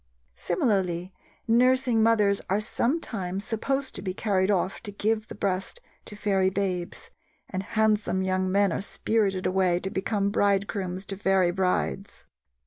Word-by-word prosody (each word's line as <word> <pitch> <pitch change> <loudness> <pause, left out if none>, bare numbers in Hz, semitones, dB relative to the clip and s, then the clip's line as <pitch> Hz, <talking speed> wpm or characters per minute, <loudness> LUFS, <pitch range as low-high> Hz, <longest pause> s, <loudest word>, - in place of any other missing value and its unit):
Similarly, 190 - -1 0.3
nursing 250 0 +3
mothers 210 -3 +3
are 195 +2 +2
sometimes 215 - -2
supposed 270 +4 -2
to - - -4
be 185 -2 -4
carried 195 -3 +1
off 190 -1 0
to 205 - -5
give 215 +1 -1
the - - -8
breast 195 - -2 0.3
to 210 - -8
fairy 195 -2 +1
babes, 185 -2 -3 0.4
and 185 - -3
handsome 210 -2 +1
young 185 0 0
men 200 -1 +3
are - - -2
spirited 200 -2 0
away 185 -2 +2
to 190 - -4
become 200 +1 -1
bridegrooms 195 -2 0
to 195 - -4
fairy 190 -2 +2
brides. 180 - -2
195 Hz, 140 wpm, -26 LUFS, 185-215 Hz, 0.4 s, nursing